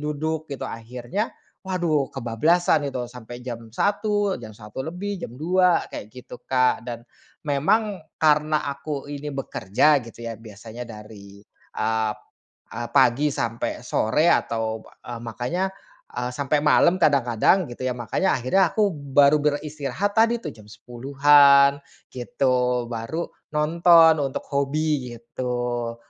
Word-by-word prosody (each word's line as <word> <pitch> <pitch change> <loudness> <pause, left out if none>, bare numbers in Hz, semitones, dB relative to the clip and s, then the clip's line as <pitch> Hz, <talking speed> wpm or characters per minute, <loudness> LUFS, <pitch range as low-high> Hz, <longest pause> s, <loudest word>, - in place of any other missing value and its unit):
duduk, 155 +1 -3
gitu. 140 -3 -5
Akhirnya, 120 - -4 0.3
waduh 170 -7 0
kebablasan 145 +5 +1
gitu 125 -2 -4
sampai 120 0 -10
jam 115 -2 -8
01:00, 205 - 0
jam 110 - -9
01:00 105 +4 -8
lebih, 180 +6 -4
jam 175 -11 -7
02:00, 180 +2 +2
kayak 105 - -7
gitu 125 -1 -12
Kak. 125 -3 +1
Dan, 120 0 -7 0.4
memang 185 +7 +1 0.2
karena 150 -1 +2
aku 140 0 -5
ini 145 0 -6
bekerja 135 +1 +1
gitu, 115 0 -10
ya, 115 - -4
biasanya 110 +2 -10
dari, 105 -3 -11 0.4
ap 110 -1 0 0.5
eee, 120 - -5
pagi 125 +6 +4
sampai 115 -3 -3
sore 150 +10 +1
atau 110 -8 0
ba - - -18 0.2
eee, 120 -1 -6
makanya, 120 +10 -3 0.5
eee, 125 0 -2
sampai 140 +2 0
malam 170 +4 +4
kadang-kadang 140 - +2
gitu, 130 +1 -5
ya. 125 - -1
Makanya 120 - 0
akhirnya 140 +10 +2
aku 210 -2 +3
baru 140 -1 +3
beristirahat 150 +7 -2
tadi, 230 +1 +3
tuh, - - -4
jam 105 -2 -15
10:00-an, 140 +5 +4 0.3
gitu. 125 -1 0
Baru 115 +9 -4 0.2
nonton 165 +1 +5
untuk 135 -2 -2
hobi 140 -2 -1
gitu. 120 0 -3
140 Hz, 130 wpm, -23 LUFS, 120-155 Hz, 0.5 s, nonton